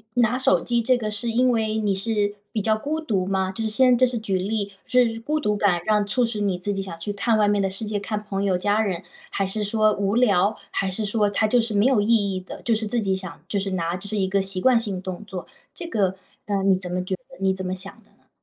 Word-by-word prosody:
拿 245 0 +3
手 185 -9 +3
机 235 +3 0
这 255 +2 +3
个 215 -3 -3
是 210 +3 +1
因 250 +2 +3
为 220 -2 0
你 205 -3 +1
是 205 0 0 0.2
比 215 - -1
较 220 +1 +2
孤 300 +8 -3
独 205 -12 -1
吗？ 190 0 0
就 205 +4 -4
是 220 - 0
先 250 +3 +5
这 255 - +5
是 245 -2 -1
举 200 -4 -1
例 200 +1 -2
是 235 -3 +2
孤 305 +6 -1
独 210 -8 0
感 190 -4 +2
让 210 -1 +2
促 240 +4 +2
使 225 -2 -3
你 195 -3 0
自 205 +3 -2
己 195 - -2
想 180 -4 -7
去 205 +5 -4
看 215 +3 +1
外 210 - +3
面 205 0 +2
的 195 - +1
世 195 +3 -4
界、 210 0 -2
看 210 +1 -3
朋 200 -1 -3
友 190 -2 +2
家 205 +4 +1
人？ 190 -3 -2 0.3
还 195 - -1
是 210 +2 -1
说 215 +1 +2
无 200 +1 -1
聊？ 205 -4 +3
还 195 -1 -1
是 210 +3 0
说 210 0 +1
它 215 +2 +1
就 240 +2 +3
是 225 -1 -3
没 205 +2 +3
有 260 -5 +4
意 205 - -1 0.3
义 185 - -3
的 185 - -10
就 230 - +2
是 220 0 -1
自 235 +2 0
己 195 -2 0
想 190 -4 -7
就 200 - -2
是 195 0 -2
拿 170 -2 -1
这 200 +2 -6
是 215 - -2
一 190 -1 +1
个 195 +1 +1
习 190 -1 -1
惯 255 +5 +4
性 205 -5 -2
动 185 +1 -6
作？ 190 -3 -7 0.3
这 345 -2 -6
个， 200 - +1 0.3
嗯， 195 -1 +1
你 190 - +5
怎 180 -1 -7
么 180 0 -1
觉 190 - -1
得 - - -24 0.2
你 190 0 +2
怎 190 0 -6
么 185 - -2
想 190 +1 -7
的 - - -30
呢？ - - -33
205 Hz, 300 characters per minute, -23 LUFS, 190-225 Hz, 0.3 s, 先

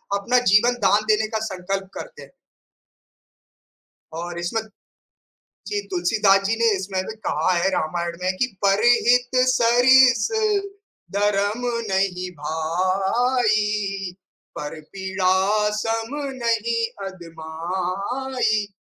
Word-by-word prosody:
अपना 235 +5 +2
जीवन 235 +4 +5
दान 205 +2 +3
देने 215 0 +2
का 220 0 -3
संकल्प 195 0 -4
करते - - -9
हैं। - - -13 1.8
और 170 +1 -5
इसमें 180 +6 -2 1.1
जी 415 -1 -2
तुलसीदास 215 - +2
जी 225 - +1
ने 230 -1 +3
इसमें 190 0 -3
भी 220 - -6
कहा - - +1
है 175 +2 +1
रामायण 170 0 -2
में 185 +1 +1
कि 260 - +1 0.2
"परिहित 240 +4 +3
सरिस 245 -1 +5 0.9
धर्म 205 +4 0 0.2
नहीं 185 -1 -1
भाई। 195 - 0 0.5
पर 150 +1 -6
पीड़ा 190 +2 +1
सम 225 +4 -2 0.3
नहीं 230 0 0 0.2
अदमाई।" 190 +8 -3
205 Hz, 100 wpm, -22 LUFS, 185-230 Hz, 1.8 s, जीवन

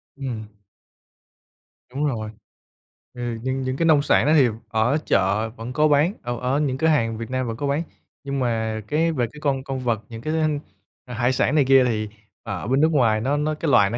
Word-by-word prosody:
Ừm. 125 -6 -5 1.5
Đúng 145 +3 -1
rồi. 110 -7 -2 0.8
Ừ, 120 -2 -4
nhưng 130 +1 -1
những 130 0 -2
cái 165 - +1
nông 155 -3 +5
sản 145 - +3
đó 150 - +3
thì 140 -5 +6 0.2
ở 110 +6 +2
chợ 100 +3 +1
vẫn 115 +2 -8
có 150 +3 +3
bán, 150 +5 +3
ở 120 -1 -3
ở 130 +3 0
những 135 -4 0
cửa 160 - +1
hàng 115 -8 +2
Việt 115 0 -6
Nam 130 -1 -2
vẫn 115 -1 -4
có 140 +2 -2
bán. 145 +4 0 0.4
Nhưng 140 0 -3
mà 110 -3 -1
cái 160 +5 +1
về 130 -6 0
cái 150 - -12
con 135 -3 0
con 135 -1 -4
vật, 120 -4 -1
những 115 -1 -8
cái 155 +5 -2
thức 160 - +1
ăn 155 -2 +1 0.5
hải 120 +1 0
sản 130 +3 +1
này 145 -3 +4
kia, 135 0 +6
thì 110 -3 -1 0.3
ở 100 -2 -5
bên 135 +3 +2
nước 160 - +4
ngoài 115 -7 +3
nó 140 +5 0
nó 150 +1 0
cái 155 -1 -1
loài 100 -6 +5
nó 120 - -3
130 Hz, 225 wpm, -23 LUFS, 115-145 Hz, 1.5 s, thì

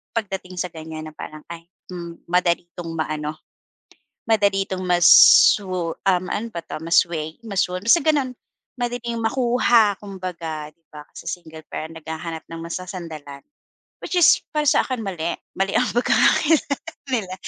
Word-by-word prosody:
pagdating 190 -4 -4
sa 180 - -1
ganyan 155 -1 -8
na - - -25
parang, 155 0 -9
ay, 170 -1 -8 0.3
hmm, 170 -2 -8
madali 175 0 +1
itong 170 -2 -6
ma-ano, 155 -1 -3 0.9
madali 200 -3 +3
itong 185 -1 -4
ma-swo 180 0 +6
um 185 -1 +3
ano 225 +3 -2
ba 170 - -4
'to, - - -6
ma-sway, 165 -2 +1
ma 200 - -6
swoon, 180 0 0
basta 290 +9 +6
gano'n. 290 -5 +2 0.5
Madaling 240 -1 -3
makuha 235 -3 +3
kumbaga 170 -6 -6
'di 165 - -46
ba, 150 -1 -9
kasi - - -12
single 160 -3 -9
parent, 160 +1 -6
naghahanap 160 +1 -6
ng 165 0 -8
masasandalan 165 -5 -7 0.6
which - - -4
is 350 -3 +6
para 300 -1 0
sa - - +5
akin, 255 -3 -3
mali. 170 -4 -3 0.2
Mali 195 0 0
ang - - +4
pagkakakilala 285 +4 +3 0.4
nila 200 -7 -1
180 Hz, 150 wpm, -22 LUFS, 165-210 Hz, 0.9 s, ma-swo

